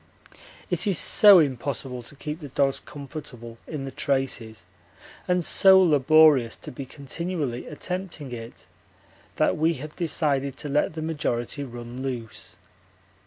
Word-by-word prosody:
It 175 +2 -1
is 195 -5 +2
so 205 -2 +7
impossible 135 -3 -1
to 120 +4 -12
keep 150 +3 -6
the 150 - -8
dogs 135 0 0
comfortable 130 -5 -10
in 145 -4 -5
the 135 - -6
traces 130 -5 -2 0.6
and 180 -2 +1
so 190 -1 +6
laborious 150 -6 +5
to - - -10
be 135 +1 -8
continually 145 -2 -4
attempting 175 -3 -6
it, 115 -1 -9 0.7
that - - +1
we 160 +2 +2
have 150 +3 -9
decided 140 -5 -1
to 145 - -6
let 150 +2 0
the 160 - -4
majority 145 -4 -2
run 120 -1 -8
loose. 115 -5 -6
140 Hz, 135 wpm, -25 LUFS, 125-160 Hz, 0.7 s, so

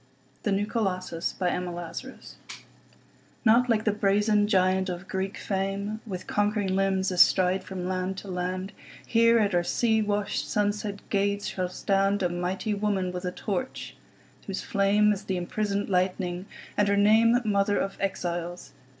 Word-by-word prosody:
The 205 - -1
New 200 +1 +1
Colossus 185 -6 -2
Emma 180 0 -1
Lazarus 175 +10 -8 1.1
NOT 235 +3 +5
like 220 -2 +2
the 215 - +2
brazen 205 +1 +2
giant 190 -1 +2
of 180 +1 -6
Greek 190 +1 -3
fame, 200 +2 -2
With 185 -3 -5
conquering 205 -2 0
limbs 190 -1 +1
astride 185 +1 +4
from 185 -2 -5
land 185 0 -2
to 200 - -8
land; 185 +1 -3 0.3
Here 230 0 +4
at 205 -3 +2
our 175 - +3
sea 220 +4 +2
washed, 205 -1 -1
sunset 205 -1 -1
gates 200 0 +1
shall 185 -1 -2
standA 195 0 +1
mighty 185 +4 -2
woman 200 -3 0
with 180 +1 -5
a 180 - -1
torch, 215 +8 -4 0.5
whose 195 -1 -4
flameIs 205 +1 +2
the 190 - -1
imprisoned 200 +3 -2
lightning, 180 0 -1 0.3
and 205 - +2
her 200 0 +2
nameMother 215 -1 +4
of 195 - -2
Exiles. 175 -2 -3
195 Hz, 140 wpm, -27 LUFS, 185-210 Hz, 1.1 s, NOT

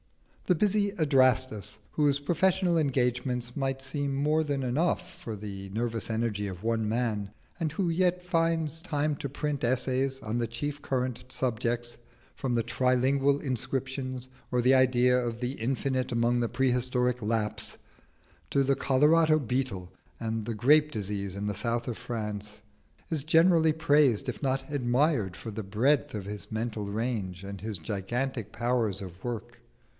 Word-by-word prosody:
The 180 - +4
busy 205 +2 +2
Adrastus, 130 - +2
whose 145 -2 +2
professional 175 +3 +2
engagements 125 -4 0
might 135 -1 -1
seem 140 +1 -2
more 150 +3 +2
than 140 -3 -2
enough 170 +7 0
for 115 -8 -7
the 100 -1 -7
nervous 115 +2 -2
energy 110 -2 -1
of 90 -2 -7
one 115 -1 0
man, 110 -4 -1 0.3
and 160 -3 -1
who 180 +4 -1
yet 180 +1 +1
finds 165 -3 +1
time 150 -1 0
to 140 - -4
print 145 0 -3
essays 130 +2 +1
on 110 +2 -2
the 120 - 0
chief 145 +6 -4
current 130 -3 -2
subjects, 120 -2 -1 0.4
from 130 -3 -1
the 115 - +2
tri 125 +2 +1
lingual 140 +2 +2
inscriptions, 130 0 -3 0.2
or 125 -1 +2
the 130 +2 +5
Idea 125 -1 +4
of 120 -2 -2
the 125 0 -1
Infinite 130 +1 -1
among 120 +1 +2
the 120 - 0
prehistoric 125 -1 +1
Lapps, 105 0 -1 0.7
to 140 - +2
the 135 +1 +2
Colorado 155 +4 +4
beetle 125 -9 -3 0.3
and 110 -1 -2
the 115 - -3
grape 150 +7 +4
disease 100 -3 -3
in 100 - -3
the 105 - -1
south 120 +3 -1
of 120 - -3
France, 105 -4 -5 0.5
is 155 -5 -1
generally 160 +1 +5
praised 145 -6 +3
if 125 - -4
not 135 +1 -1
admired 125 - +1
for 110 - -7
the 110 +1 -5
breadth 115 +8 +2
of 105 -3 -4
his 105 0 -7
mental 110 -2 -3
range 100 -4 -3
and 100 -1 -7
his 110 -1 -3
gigantic 110 - -3
powers 120 -5 0
of 95 -1 -9
work. 120 0 -5
125 Hz, 155 wpm, -29 LUFS, 110-140 Hz, 0.7 s, the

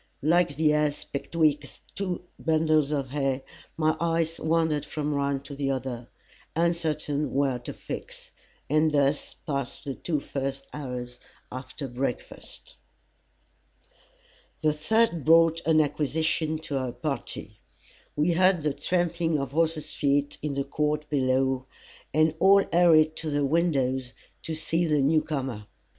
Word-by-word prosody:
Like 165 -1 +3
the 150 +1 +3
ass 150 -1 0
betwixt 150 -1 -1 0.2
two 185 -3 -3 0.2
bundles 155 -2 +2
of 140 -4 -2
hay, 135 -2 -1 0.3
my 155 0 +2
eyes 165 0 0
wandered 160 -2 +1
from 150 -1 -3
one 140 -1 0
to 140 +1 -9
the 140 -1 -2
other 130 -3 -3 0.5
uncertain 155 -3 0
where 135 -3 +1
to 120 - -7
fix. - - -8 0.4
And 155 +2 +3
thus 145 0 +1
passed 140 -4 -3
the 140 - -3
two 155 +2 -2
first 135 0 -4
hours 125 -4 -6 0.3
after 130 +2 -6
breakfast. 135 - -5 1.9
The 155 -1 +3
third 170 +2 +1
brought 165 +2 +5
an 160 -1 +5
acquisition 155 +2 0
to 140 -2 -1
our 130 -2 -3
party. 135 +1 -5 0.6
We 150 +4 +2
heard 180 -1 +3
the 150 -2 +1
trampling 170 +1 0
of 140 -2 -3
horses' 155 0 0
feet 145 0 0
in 145 -2 -2
the 140 - 0
court 150 +2 -1
below, 130 -1 +1 0.4
and 155 +1 +3
all 195 +2 +6
hurried 160 -3 +5
to 160 - -3
the 145 -1 +1
windows, 135 -5 +1 0.3
to 160 - -4
see 165 +2 0
the 150 -1 +2
new 155 +3 +3
comer. 130 -9 -4
150 Hz, 135 wpm, -27 LUFS, 135-160 Hz, 1.9 s, all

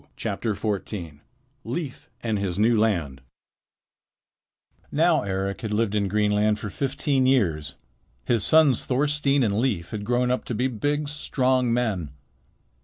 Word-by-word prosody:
Leif 130 +3 -5
and 110 -3 0
His 95 -3 -2
New 115 +3 +4
Land 85 -12 0 1.7
Now 160 +2 +3
Eric 95 0 -3
had 105 -2 -2
lived 110 -1 +1
in 105 -2 +1
Greenland 105 +1 +2
for 105 -1 -6
fifteen 135 0 0
years. 80 - +1 0.5
His 115 0 +1
sons 150 -1 +4
Thorstein 140 +1 +2
and 105 -2 +1
Leif 100 -10 -1
had 105 -2 -4
grown 125 +2 +1
up 125 - -1
to 120 - -3
be 125 +4 +1
big, 145 +5 -1
strong 130 -4 0
men. 110 -10 0
115 Hz, 125 wpm, -25 LUFS, 100-135 Hz, 1.7 s, New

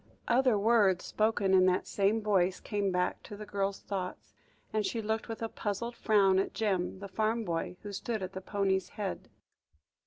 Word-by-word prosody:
Other 250 -2 +4
words 205 -4 +3
spoken 215 -3 +1
in 185 -1 +6
that 185 0 +2
same 210 +2 +1
voice, 190 -3 +2
came 200 -2 -1
back 180 0 0
to 205 - -9
the 210 - -7
girl's 200 -1 -2
thoughts, 185 -2 -5 0.4
and 215 -1 +1
she 210 +4 -2
looked 220 0 -2
with 225 0 -5
a - - 0
puzzled 225 +2 -4
frown 195 -5 +4
at 195 - -2
Jem, 195 -4 0
the 200 +1 -7
farm 220 +4 0
boy, 170 +1 -3
who 205 -1 -6
stood 215 +1 -3
at 185 - -5
the 190 - -5
pony's 190 -2 0
head. 200 -3 -5
200 Hz, 185 wpm, -31 LUFS, 190-220 Hz, 0.4 s, in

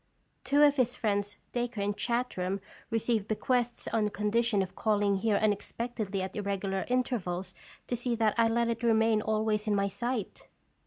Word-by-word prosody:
Two 290 +1 +4
of 290 -1 +5
his 250 -1 +2
friends, 205 -3 -1
Dacre 240 -2 -2
and 200 0 0
Chartram, 200 -6 -1 0.3
re 225 - +1
ceived 225 -2 0
bequests 240 +2 0
on 215 -2 +1
condition 210 0 +1
of 185 - -8
calling 205 -2 +2
here 215 +1 +1
unexpectedly 215 -1 -1
at 190 - -6
irregular 195 -2 -2
intervals 195 -8 -1 0.3
to 245 - -2
see 240 0 -1
that 220 -2 +2
I 230 -1 +4
let 235 +1 +1
it 230 0 -2
remain 225 -2 +3
always 215 0 0
in 210 - +2
my 200 0 +1
sight." 240 0 -4
220 Hz, 165 wpm, -30 LUFS, 200-235 Hz, 0.3 s, of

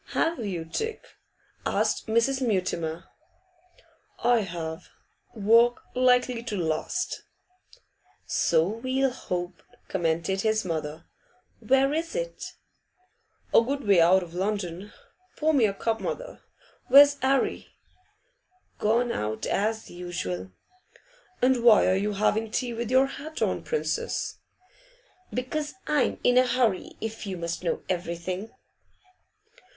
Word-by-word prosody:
'. - - -12
'Have 330 -2 +1
you, 180 -6 -3
Dick?' 445 - -4 0.6
asked - - 0
Mrs. 230 +5 +2
Mutimer. 180 -7 -1 1.2
'I 240 0 +4
have. 165 -5 -5 0.5
Work 230 +3 +4
likely 250 -1 +3
to 225 -3 -4
last.' 165 - -2 1.0
'So 165 0 +2
we'll 255 +5 0
hope,' 180 -7 -5 0.3
commented 170 +2 0
his 215 -1 +1
mother. 155 -2 -4 0.5
'Where 270 +2 +3
is 330 +5 -2
it?' - - -5 1.0
'A - - +8
good 275 +4 -2
way 195 -4 +5
out 185 +3 +5
of 170 -1 -11
London. 190 0 -3 0.5
Pour 315 +1 +2
me 260 -6 +4
a 200 - -2
cup, 225 +2 -1
mother. - - -5 0.5
Where's 285 +1 +8
'Arry?' 265 +1 +1 1.1
'Gone 235 +3 +2
out, 110 - -3
as 220 +2 -1
usual.' 95 - -5 0.9
'And 255 -2 +3
why 225 -4 +7
are 185 - +3
you 205 +2 0
having 215 +2 +1
tea 245 +2 -2
with 230 0 -4
your 260 +1 +5
hat 290 +3 -5
on, - - 0
Princess?' 470 -1 -2 0.9
'Because 295 +4 -3
I'm 300 -4 +1
in 245 0 +5
a 255 - +3
hurry, 240 -6 +1
if 225 -1 -5
you 190 -2 -4
must 170 +1 -4
know 170 - -1
everything. 180 +3 -3
220 Hz, 120 wpm, -26 LUFS, 180-255 Hz, 1.2 s, A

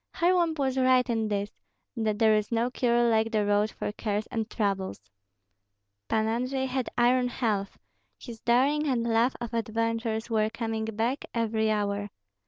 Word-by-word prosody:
Kharlamp 345 -2 +2
was 265 -2 0
right 255 -1 +4
in 225 -2 0
this, 205 0 -2 0.4
that 220 -3 -1
there 220 -1 +4
is 210 +1 0
no 235 +2 +1
cure 240 -1 +2
like 225 -1 +2
the 215 -2 +1
road 205 +1 +2
for - - -4
cares 210 0 -2
and 225 -1 -2
troubles. 195 - -2 1.1
Pan 220 0 +1
Andrei 255 +4 -1
had 260 -1 -2
iron 250 +1 +3
health; 215 -5 -2 0.4
his 235 -4 -10
daring 275 +6 +2
and 250 -4 +1
love 235 +2 +2
of 240 -1 -6
adventures 230 0 -1
were 220 -2 +1
coming 225 -1 -3
back 225 +5 -2
every 220 -1 +1
hour. 205 -1 -1
230 Hz, 160 wpm, -27 LUFS, 215-250 Hz, 1.1 s, right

